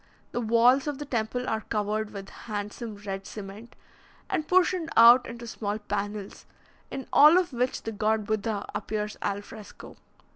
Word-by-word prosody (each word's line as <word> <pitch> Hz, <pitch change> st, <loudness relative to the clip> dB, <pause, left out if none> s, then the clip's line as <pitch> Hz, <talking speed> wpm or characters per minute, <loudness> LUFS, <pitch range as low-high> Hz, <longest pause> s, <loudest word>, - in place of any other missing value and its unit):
The 240 Hz, -, -2 dB
walls 240 Hz, +5 st, +4 dB
of 290 Hz, -2 st, -2 dB
the 295 Hz, -, -6 dB
temple 245 Hz, -1 st, -2 dB
are 220 Hz, 0 st, -1 dB
covered 215 Hz, 0 st, -2 dB
with 195 Hz, -2 st, -8 dB
handsome 210 Hz, +1 st, -6 dB
red 195 Hz, -1 st, -5 dB
cement, 210 Hz, +3 st, -9 dB, 0.6 s
and 310 Hz, -, -1 dB
portioned 365 Hz, -2 st, +2 dB
out 235 Hz, +2 st, +8 dB
into 235 Hz, 0 st, -8 dB
small 210 Hz, -2 st, -3 dB
panels, 205 Hz, -1 st, -5 dB, 0.4 s
in 270 Hz, -, -6 dB
all 305 Hz, +4 st, +8 dB
of 360 Hz, -6 st, 0 dB
which 250 Hz, +1 st, -1 dB
the 225 Hz, -, -4 dB
god 215 Hz, 0 st, 0 dB
Buddha 215 Hz, 0 st, -2 dB
appears 210 Hz, -1 st, -3 dB
al 200 Hz, 0 st, -2 dB
fresco. 210 Hz, 0 st, -12 dB
220 Hz, 155 wpm, -27 LUFS, 210-245 Hz, 0.6 s, out